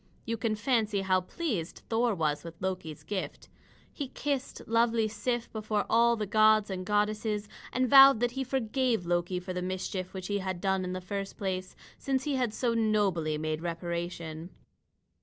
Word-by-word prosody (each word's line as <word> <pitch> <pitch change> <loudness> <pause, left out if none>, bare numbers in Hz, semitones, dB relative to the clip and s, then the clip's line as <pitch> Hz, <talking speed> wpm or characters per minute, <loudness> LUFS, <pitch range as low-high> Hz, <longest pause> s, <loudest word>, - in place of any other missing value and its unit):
You 230 - -1
can 225 -1 -1
fancy 215 -3 +1
how 185 -1 +2
pleased 195 - -4
Thor 230 -1 +1
was 150 -3 0
with 165 0 -10
Loki's 180 -5 -4
gift. 200 -2 -5 0.4
He 285 - -4
kissed 275 0 -3
lovely 230 -1 +3
Sif 235 +3 -3
before 215 -1 -1
all 235 +1 +5
the 215 -2 -2
gods 215 0 +4
and 185 -1 -4
goddesses, 210 0 0 0.2
and 255 0 +1
vowed 270 -1 +9
that 245 0 +2
he 265 +2 -2
forgave 255 -4 0
Loki 175 +1 0
for 185 +1 -6
the 180 - -3
mischief 185 0 -3
which 185 -1 -5
he 205 +1 -1
had 190 -2 -3
done 190 0 0
in 180 0 -3
the 185 - -4
first 195 +2 -5
place, 185 -2 -3 0.2
since 265 -1 0
he 295 - -1
had 250 -4 0
so 235 +2 0
nobly 200 -9 +1
made 155 0 -2
reparation. 170 -1 -4
205 Hz, 175 wpm, -30 LUFS, 180-230 Hz, 0.4 s, vowed